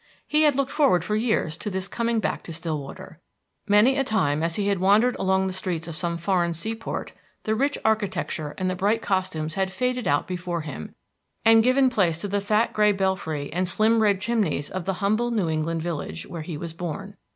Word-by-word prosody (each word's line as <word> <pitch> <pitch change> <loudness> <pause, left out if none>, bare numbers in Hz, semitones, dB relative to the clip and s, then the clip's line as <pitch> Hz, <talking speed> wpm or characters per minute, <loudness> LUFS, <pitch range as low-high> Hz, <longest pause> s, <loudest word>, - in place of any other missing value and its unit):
He 305 - +3
had 300 -3 +4
looked 275 0 0
forward 275 - +3
for 210 +4 -1
years 215 -8 0
to 210 - -4
this 190 -1 -3
coming 235 +1 0
back - - -2
to - - -7
Stillwater. 160 +1 -6 0.5
Many 215 +6 +5
a - - +3
time, 155 - +1
as 165 0 0
he 200 -1 +1
wandered 205 +7 +3
along 190 0 +1
the 190 - -2
streets 175 -3 -3
of 165 - -6
some 170 +1 -2
foreign 170 -1 0
sea 220 +8 -3
port, 225 0 -5 0.3
the 220 - 0
rich 280 +6 +1
architecture 190 -8 -1
and 185 - -1
the 185 - 0
bright 210 +5 +1
costumes 185 -5 -1
had 190 +1 -1
faded 250 +3 -1
out 145 0 +1
before 180 -2 -3
him, 145 - -8 0.5
and 225 0 +7
given 255 +3 +4
place 180 -9 +2
to - - -2
the 200 +1 -1
fat 210 +3 +1
gray 210 -1 +4
belfry 180 -7 -2
and 180 +1 0
slim 220 +4 +3
red 205 -3 +3
chimneys 210 -9 0
of 185 -2 -4
the 195 - 0
humble 220 +4 +2
New 215 -7 0
England 160 +1 -1
village 145 - -4
where 170 - -7
he 155 0 -6
was 165 +1 -6
born. 180 +4 -6
190 Hz, 205 wpm, -25 LUFS, 170-220 Hz, 0.5 s, and